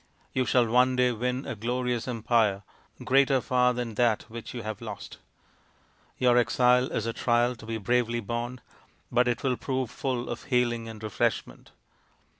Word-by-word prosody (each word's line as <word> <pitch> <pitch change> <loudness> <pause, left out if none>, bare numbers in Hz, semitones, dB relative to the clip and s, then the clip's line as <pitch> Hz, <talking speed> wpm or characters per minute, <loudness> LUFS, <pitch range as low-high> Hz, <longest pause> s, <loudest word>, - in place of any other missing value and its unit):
You 130 -1 +1
shall 125 -2 +4
one 125 +3 +3
day 125 0 +3
win 125 +3 -2
a - - -3
glorious 120 +2 -2
empire, 115 -4 +1 0.4
greater 135 +1 +4
far 125 -1 +2
than 120 -2 -3
that 115 -1 +2
which 115 0 -7
you 120 -2 -6
have 110 -1 -5
lost. - - -8 1.0
Your 125 -1 +4
exile 125 +2 +3
is 110 - -2
a 115 - -2
trial 120 +1 +1
to 110 - -12
be 115 0 -2
bravely 120 +2 0
borne, 120 +3 -4 0.5
but 125 +1 +3
it 120 -2 -1
will 130 -3 +1
prove 130 -3 -2
full 125 -3 -3
of 120 - -6
healing 120 -3 0
and 110 -1 -10
refreshment. 105 -2 -2
120 Hz, 165 wpm, -27 LUFS, 115-125 Hz, 1.0 s, shall